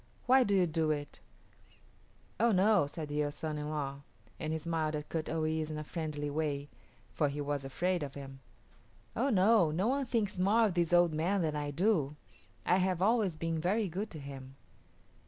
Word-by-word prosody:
Why 260 +1 +6
do 200 -3 +1
you 185 -2 +4
do 160 -1 0
it?" 145 -1 -3 1.2
"Oh 235 +1 +4
no," 200 -4 +4
said 150 +1 -6
the 145 0 0
son 155 0 -4
in 150 0 -4
law, 140 -2 -3 0.4
and 155 - -3
he 160 - 0
smiled 160 -1 -1
at 150 0 -5
Kut 160 -1 -3
o 160 0 -1
yis´ 155 0 -1
in 155 - -4
a 150 - -4
friendly 150 -2 -4
way, 145 -1 -2 0.4
for 150 - +1
he 145 +1 -5
was 145 -1 -2
afraid 175 +6 -1
of 140 -2 -5
him. 135 -1 -9 0.8
"Oh 265 +5 +1
no; 205 - +4
no 180 +9 0
one 275 0 0
thinks 210 -6 -1
more 215 +5 +4
of 205 - 0
this 170 -1 +1
old 175 -2 +5
man 175 +5 +1
than 155 -2 -1
I 145 -1 -2
do. 150 -2 +1 0.5
I 180 - +4
have 185 -1 +1
always 210 -5 +2
been 165 0 -2
very 200 +5 +1
good 200 +6 -4
to 155 - -9
him." 135 -1 -9
160 Hz, 195 wpm, -32 LUFS, 150-190 Hz, 1.2 s, Why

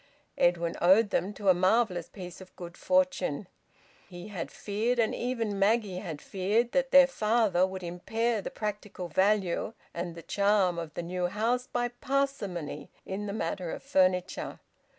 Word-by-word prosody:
Edwin 170 -1 +2
owed 200 +4 +5
them 190 - 0
to 200 -1 0
a - - +8
marvellous 185 -1 +2
piece 180 -2 -9
of 185 - -14
good 175 -1 -9
fortune. 275 -1 +1 0.6
He 175 +2 -9
had 185 -5 -5
feared, 220 +4 -1
and 230 -2 +2
even 230 -5 -2
Maggie 200 -2 +2
had 165 -7 -7
feared, 210 +5 0
that 270 -1 +1
their 275 0 +8
father 215 -7 +2
would 190 -1 -7
impair 225 +6 -1
the - - -5
practical 210 -4 -5
value 190 +3 +1 0.2
and 170 0 -4
the 165 - -9
charm 200 -1 +2
of 165 -2 -7
the - - -3
new 180 +1 -1
house 235 +6 0
by 245 0 -1
parsimony 245 - -2 0.2
in 200 +2 -4
the - - -3
matter 180 -3 -3
of - - -6
furniture. 185 -1 +1
195 Hz, 160 wpm, -29 LUFS, 180-225 Hz, 0.6 s, a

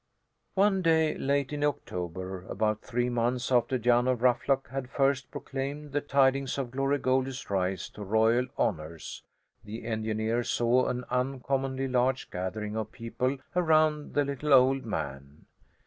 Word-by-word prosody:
One 195 -1 +3
day, 160 -2 +3
late 140 0 0
in 145 0 -2
October, 90 - -3
about 110 +1 -1
three 125 0 -1
months 120 +1 0
after 125 +1 +3
Jan 120 +1 +3
of 125 -2 0
Ruffluck 130 +2 +2
had 135 -1 -4
first 135 -1 +1
proclaimed 140 +2 -5
the 145 +1 0
tidings 135 -1 +2
of 130 -3 -3
Glory 135 +2 +1
Goldie's 130 -2 -1
rise 95 -1 -1
to 105 - -9
royal 110 +5 +3
honours, 80 +1 -3 0.4
the 110 +2 -8
engineer 110 +1 -1
saw 120 +2 +2
an 125 0 -2
uncommonly 135 +1 -1
large 130 +1 0
gathering 105 +4 -4
of 110 -1 -3
people 130 +2 -2 0.2
around 155 -3 +2
the 145 - +3
little 140 +1 0
old 130 +1 +4
man. 70 -6 -5
125 Hz, 145 wpm, -29 LUFS, 110-135 Hz, 0.4 s, old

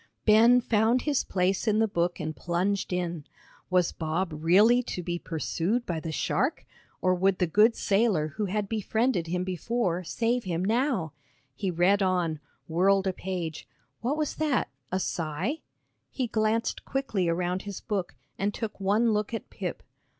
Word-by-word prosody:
Ben 230 +3 +6
found 230 +2 +2
his 295 -3 +1
place 190 +2 0
in 215 -1 +3
the 220 0 +3
book 175 -2 -1
and 155 -1 -4
plunged 185 +4 -1
in. 175 -3 -2 0.5
Was 180 -2 +3
Bob 165 +3 -2
really 195 +11 +5
to 185 -7 -5
be 175 0 -3
pursued 175 +8 -1
by 170 -2 -2
the 160 0 -5
shark, - - -1 0.4
or 185 - +4
would 190 +1 +2
the 180 - +2
good 210 +7 +4
sailor 195 -7 +2
who 205 +8 -3
had 200 +1 -1
befriended 220 -2 0
him 180 +2 -1
before, 185 0 -1
save 235 +7 0
him 180 -1 -2
now? 225 - 0 0.4
He 195 +7 -2
read 180 +4 +3
on 180 -5 +1 0.3
whirled 190 +4 +3
a 190 - 0
page 175 -4 -5 0.3
what 260 +6 -1
was 305 -2 -2
that, 305 -4 +1 0.2
a 185 - 0
sigh? 175 - -2 0.5
He 260 - -2
glanced 220 0 0
quickly 220 -10 -1
around 180 +2 -1
his 200 -2 -6
book, 200 -5 -3 0.2
and 200 +2 0
took 225 -3 -5
one 215 +4 +2
look 210 +2 -1
at - - -7
Pip. - - -5
190 Hz, 165 wpm, -28 LUFS, 175-225 Hz, 0.5 s, Ben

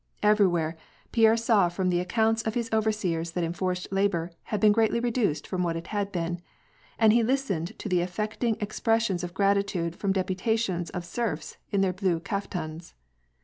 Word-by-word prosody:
Everywhere, 175 -6 +3 0.3
Pierre 225 -1 +5
saw 225 -6 +3
from 185 +1 -1
the 175 -1 +2
accounts 225 +4 +1
of 220 -1 -3
his 235 -1 -2
overseers 195 -7 0
that 175 - -1
enforced 180 +2 -2
labor 195 -4 +1
had 210 - -2
been 215 -1 +6
greatly 225 +2 +2
reduced 235 - 0
from 185 - -2
what 170 -2 0
it 165 - -5
had 200 -1 -1
been, 175 -1 -2 0.6
and 220 -1 +5
he 235 - +5
listened 225 -7 -1
to - - -6
the 180 -3 +2
affecting 215 +5 -1
expressions 215 -3 0
of 175 0 -6
gratitude 195 -4 +1
from 200 - -1
deputations 190 -1 0
of 180 -1 -5
serfs 175 -5 -3
in 200 - +1
their 190 -1 +2
blue 185 -3 0
kaftans. 170 -4 -5
195 Hz, 170 wpm, -27 LUFS, 175-220 Hz, 0.6 s, been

